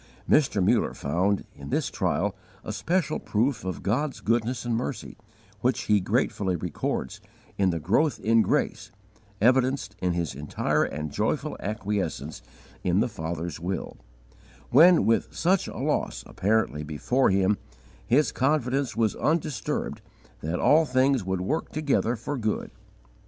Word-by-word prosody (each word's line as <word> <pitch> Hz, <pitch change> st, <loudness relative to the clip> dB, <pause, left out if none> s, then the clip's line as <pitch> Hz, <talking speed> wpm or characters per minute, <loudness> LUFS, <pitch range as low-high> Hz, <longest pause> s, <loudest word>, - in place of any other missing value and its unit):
Mr. 110 Hz, -11 st, +3 dB
Muller -, -, +2 dB
found, 90 Hz, +8 st, 0 dB
in 70 Hz, 0 st, -9 dB
this -, -, 0 dB
trial, -, -, 0 dB, 0.3 s
a -, -, -5 dB
special 175 Hz, -2 st, 0 dB
proof 115 Hz, +4 st, 0 dB
of 95 Hz, -1 st, -4 dB
God's 130 Hz, +7 st, -1 dB
goodness 115 Hz, +1 st, 0 dB
and 120 Hz, -1 st, 0 dB
mercy, 120 Hz, 0 st, -4 dB, 0.4 s
which 125 Hz, +1 st, +1 dB
he 105 Hz, -1 st, +3 dB
gratefully 95 Hz, 0 st, 0 dB
records, 85 Hz, -2 st, -3 dB, 0.3 s
in 95 Hz, -1 st, +2 dB
the 85 Hz, -2 st, -1 dB
growth 115 Hz, -, +1 dB
in 115 Hz, +1 st, +4 dB
grace, -, -, 0 dB, 0.5 s
evidenced 130 Hz, -1 st, +2 dB
in 90 Hz, -1 st, 0 dB
his 85 Hz, -4 st, -2 dB
entire 70 Hz, +2 st, 0 dB
and 75 Hz, 0 st, -5 dB
joyful -, -, -1 dB
acquiescence 95 Hz, -, -3 dB, 0.4 s
in 90 Hz, +1 st, +2 dB
the -, -, +2 dB
Father's 85 Hz, -5 st, -5 dB
will, 90 Hz, +3 st, -4 dB, 0.8 s
when, 165 Hz, +6 st, +7 dB
with 115 Hz, -, +1 dB
such 185 Hz, +3 st, +2 dB
a -, -, -7 dB
loss -, -, -1 dB
apparently 100 Hz, -7 st, 0 dB
before 80 Hz, -, +1 dB
him, 100 Hz, +1 st, +2 dB, 0.4 s
his 140 Hz, +3 st, +3 dB
confidence 135 Hz, -1 st, 0 dB
was 110 Hz, -3 st, +2 dB
undisturbed 155 Hz, -3 st, -1 dB, 0.4 s
that 80 Hz, +3 st, -3 dB
all 160 Hz, +2 st, +5 dB
things 130 Hz, -3 st, +2 dB
would 95 Hz, 0 st, -2 dB
work 145 Hz, -, -2 dB
together 140 Hz, -6 st, +1 dB
for 135 Hz, +5 st, -4 dB
good. 110 Hz, -2 st, -2 dB
110 Hz, 140 wpm, -26 LUFS, 90-130 Hz, 0.8 s, when